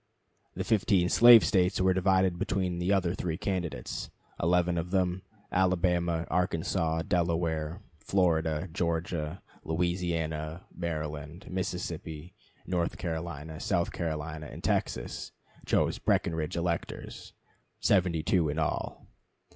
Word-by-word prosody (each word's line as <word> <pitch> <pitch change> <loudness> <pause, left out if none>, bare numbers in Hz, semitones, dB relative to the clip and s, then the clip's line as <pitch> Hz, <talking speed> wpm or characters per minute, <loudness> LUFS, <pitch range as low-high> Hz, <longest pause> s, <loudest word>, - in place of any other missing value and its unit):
The - - -2
15 100 -5 +2
slave 120 -4 +9
States 90 +2 +2
were 95 0 +4
divided 95 -1 +2
between 90 -3 -1
the 90 +2 0
other 90 -3 +2
three 85 -3 -3
candidates. 85 -10 -3 0.3
Eleven 90 +1 +2
of 85 +2 -4
them 90 -1 +1 0.3
Alabama, 90 -2 +2
Arkansas, 80 -2 0
Delaware, 85 -1 0 0.2
Florida, 80 -2 +1
Georgia, 85 -1 -2 0.2
Louisiana, 80 -1 -2
Maryland, 75 0 -4
Mississippi, 90 -2 -4 0.3
North 90 -2 -1
Carolina, 80 -2 -5
South 85 -4 0
Carolina, 75 -2 -4
and - - -10
Texas - - -2 0.3
chose - - +2
Breckinridge 80 0 0
electors, 85 0 -4 0.5
72 90 -3 +2
in 75 - -3
all. 80 - -2
85 Hz, 105 wpm, -29 LUFS, 80-90 Hz, 0.5 s, slave